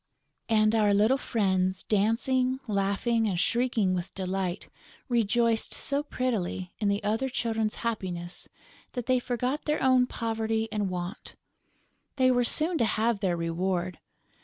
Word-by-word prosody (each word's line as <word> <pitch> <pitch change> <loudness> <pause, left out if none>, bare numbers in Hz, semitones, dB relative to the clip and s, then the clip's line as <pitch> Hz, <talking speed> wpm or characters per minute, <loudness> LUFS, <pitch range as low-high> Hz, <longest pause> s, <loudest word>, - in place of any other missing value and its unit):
And 215 -1 +4
our 210 -2 +3
little 220 +7 +3
friends, 190 -5 0
dancing, 250 +5 +1
laughing 210 +3 +1
and 180 -3 -1
shrieking 230 -2 +1
with 180 0 -3
delight, 190 -1 -3 0.4
rejoiced 230 -1 +1
so 280 +1 +1
prettily 215 - -2
in 210 - 0
the 200 +1 0
other 225 +6 0
children's 225 -3 -1
happiness 180 -6 -4 0.4
that 245 -3 -4
they 255 -1 +3
forgot 250 +4 -2
their 300 0 0
own 255 -1 +4
poverty 225 -1 -1
and 210 -3 -1
want. 180 +3 -6 0.8
They 255 -1 +4
were 245 -1 +3
soon 320 +6 0
to 230 - +3
have 225 0 +1
their 185 -3 0
reward. 175 +1 -2
220 Hz, 135 wpm, -28 LUFS, 190-245 Hz, 0.8 s, And